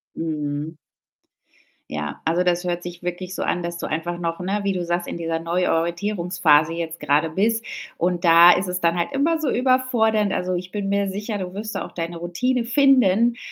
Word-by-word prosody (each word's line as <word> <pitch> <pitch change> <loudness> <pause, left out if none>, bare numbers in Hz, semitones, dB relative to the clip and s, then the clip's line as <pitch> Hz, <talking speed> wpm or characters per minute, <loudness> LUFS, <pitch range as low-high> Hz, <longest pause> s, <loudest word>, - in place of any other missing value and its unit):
Mhm. 150 -1 -3 1.2
Ja, 75 -1 -5
also, 170 +3 +2
das 175 0 +1
hört 175 -1 -2
sich 175 0 -8
wirklich 180 +1 -5
so - - -4
an, 175 - -1
dass 170 0 -4
du - - -4
einfach 170 +2 -3
noch, 165 0 -3
ne, 195 +3 -1
wie 200 -1 0
du 180 -1 -2
sagst, 175 +1 -2
in - - -4
dieser 165 -1 -2
neuen 175 +2 0
Orientierungsphase 170 -2 +1
jetzt 165 -1 -5
grade 150 +2 +1
bist. 225 +6 0 0.3
Und 175 0 0
da 170 +1 +8
ist 185 +1 0
es 180 0 -3
dann 170 +1 +2
halt 170 - -1
immer 315 +4 +1
so 305 - -1
überfordernd. 240 -5 +2
Also, 180 0 -1
ich 180 +1 -4
bin 200 -1 -3
mir 200 0 +1
sicher, 205 +2 -4
du 185 -1 -6
wirst 215 +2 -5
da - - -3
auch - - -15
deine 170 0 -5
Routine 235 +9 -1
finden 240 -4 +4
180 Hz, 200 wpm, -22 LUFS, 170-205 Hz, 1.2 s, da